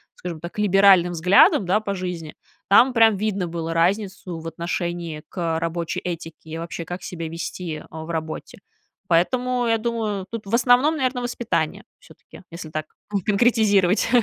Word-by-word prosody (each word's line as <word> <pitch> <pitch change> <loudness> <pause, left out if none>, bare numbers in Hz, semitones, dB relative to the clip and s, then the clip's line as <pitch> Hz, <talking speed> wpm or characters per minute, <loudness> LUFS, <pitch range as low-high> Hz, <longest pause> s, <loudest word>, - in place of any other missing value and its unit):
скажем 170 -3 -7
так, 170 +4 -7
либеральным 195 -3 +5
взглядам, 180 +3 +5
да, 190 +4 +2
по 200 -2 -3
жизни, 180 -4 -5 0.3
там 245 +6 +6
прям 225 -2 +5
видно 195 -3 -1
было 165 -1 -4
разницу 185 0 0
в 165 - -8
отношении 170 -1 -4
к 165 -3 -2
рабочей 165 0 -3
этике, 165 -2 -5
и 160 - -5
вообще 170 0 -5
как 175 +2 -7
себя 165 -2 -5
вести 165 -1 -5
в 160 +1 -8
работе. 160 +2 -5 0.5
Поэтому, 245 +8 +1
я 225 - +3
думаю, 220 -4 -2
тут 230 -2 -6
в 200 - -8
основном, 250 +6 +4
наверное, 255 -2 -1
воспитание 240 -1 -2
все-таки, - - -16
если 170 -1 -8
так 155 0 -4 0.3
не 200 - +1
конкретизировать. 205 -2 +3
180 Hz, 155 wpm, -23 LUFS, 165-215 Hz, 0.5 s, там